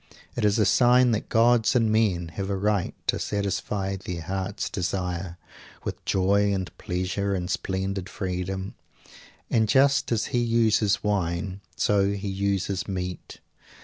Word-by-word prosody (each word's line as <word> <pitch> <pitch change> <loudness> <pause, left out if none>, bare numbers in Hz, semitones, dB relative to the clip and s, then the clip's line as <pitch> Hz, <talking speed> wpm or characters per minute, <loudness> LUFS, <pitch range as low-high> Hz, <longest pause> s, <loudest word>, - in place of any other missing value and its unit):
It 120 - -2
is 105 0 +3
a 105 - +3
sign 125 +5 +5
that 110 - -2
gods 115 +1 +4
and 115 -3 +3
men 95 -6 +1
have 95 +4 -5
a 100 - -1
right 100 -1 0
to - - +1
satisfy 100 -1 -2
their 90 -3 -6
hearts 95 +3 -3
desire, 90 -1 -3 0.5
with - - -5
joy 100 +2 +2
and 95 -3 -3
pleasure 95 +2 -2
and 90 -1 -3
splendid 95 +1 -2
freedom. 95 +1 -4 0.8
And 110 -2 +2
just 135 +1 +3
as 110 -2 +1
he 120 - +3
uses 115 -3 +2
wine, 95 -1 -1
so 100 -1 +2
he 100 0 -4
uses 100 -1 -1
meat. 90 -2 -5
100 Hz, 145 wpm, -26 LUFS, 95-105 Hz, 0.8 s, sign